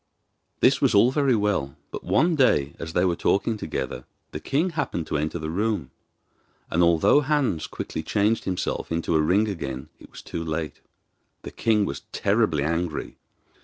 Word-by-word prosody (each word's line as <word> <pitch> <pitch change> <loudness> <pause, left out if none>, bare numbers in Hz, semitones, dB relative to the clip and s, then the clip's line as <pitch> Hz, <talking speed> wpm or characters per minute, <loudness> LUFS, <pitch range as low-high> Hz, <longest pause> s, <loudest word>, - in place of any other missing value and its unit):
This - - +4
was - - +3
all 115 +5 +6
very 135 -3 +2
well; 100 -10 0 0.2
but, - - -6
one 170 0 +2
day, 75 - +3
as 80 0 -6
they 90 - +2
were 90 -2 +1
talking 100 +6 +1
together, 105 - -4 0.3
the - - -5
king 160 +7 0
happened 145 - -2
to - - -2
enter 80 +3 -2
the 80 -1 -4
room, 100 -7 -1 0.8
and 85 - +2
although 85 - +5
Hans 135 - 0
quickly 80 - -5
changed 105 +6 +1
himself 90 -2 -2
into 85 0 0
a 80 - +4
ring 95 +8 +3
again 65 -10 -5
it - - -15
was - - -12
too 85 - -5
late. 80 -2 -4 0.6
The - - -7
king 110 -3 +2
was 70 - -5
terribly 100 -8 +1
angry. 85 +1 -2
90 Hz, 170 wpm, -25 LUFS, 80-115 Hz, 0.8 s, all